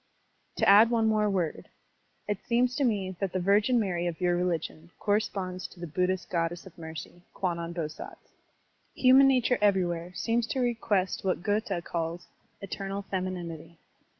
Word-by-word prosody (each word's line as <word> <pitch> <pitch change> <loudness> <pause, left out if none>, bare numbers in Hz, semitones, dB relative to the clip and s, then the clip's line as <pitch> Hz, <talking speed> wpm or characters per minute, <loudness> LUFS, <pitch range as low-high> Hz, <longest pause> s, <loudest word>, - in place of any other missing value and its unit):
To - - +2
add 210 +3 +8
one 230 -2 +2
more 215 -1 +2
word. 180 -6 -2 0.6
It 205 -1 -3
seems 245 +1 +1
to 290 - 0
me 195 -6 0
that 195 -3 -2
the 185 - 0
Virgin 205 +6 +3
Mary 175 -5 -1
of 165 -2 -4
your 175 -1 +2
religion 170 -2 -2
corresponds 195 -3 -1
to 180 - -17
the 175 - -5
Buddhist 180 +3 -1
Goddess 170 0 -1
of 190 - -13
Mercy, 160 +1 -9
Kwannon 170 -2 -2
Bosatz. 160 -3 -7 0.6
Human 265 +1 +6
nature 250 -2 +3
everywhere 180 -4 +1
seems 230 +4 0
to 265 - -2
request 225 -6 0
what 185 -2 -1
Goethe 205 -3 -1
calls 170 +1 -4 0.4
"eternal 195 0 -4
femininity." 170 -3 -4
185 Hz, 150 wpm, -28 LUFS, 175-215 Hz, 0.6 s, add